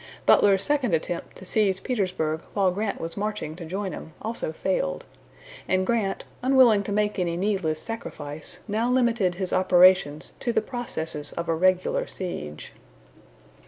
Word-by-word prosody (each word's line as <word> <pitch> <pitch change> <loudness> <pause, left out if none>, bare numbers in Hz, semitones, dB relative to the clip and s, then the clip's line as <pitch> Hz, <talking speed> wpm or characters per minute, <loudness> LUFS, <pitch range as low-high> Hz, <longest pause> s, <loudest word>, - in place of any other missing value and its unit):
Butler's 195 -1 +5
second 270 - +2
attempt 170 +2 -4
to 190 - -11
seize 195 -1 +1
Petersburg 180 - -1
while 195 -3 +3
Grant 205 +3 -2
was 165 0 -5
marching 210 -6 -3
to 170 - -7
join 190 +2 -3
him 160 - -8
also 225 -6 -3
failed, 160 - -1 0.6
and 185 0 +2
Grant, 205 -3 -1 0.2
unwilling 255 -5 +5
to - - -4
make 210 0 0
any 170 -2 0
needless 185 -5 0
sacrifice, 155 -10 -6
now 225 +3 0
limited 235 -7 +2
his 185 0 -2
operations 180 -5 +4
to 240 - -1
the - - +2
processes 160 - -4
of 170 - -4
a 165 - +2
regular 185 +2 +2
siege. 75 - -6
190 Hz, 150 wpm, -25 LUFS, 170-215 Hz, 0.6 s, Butler's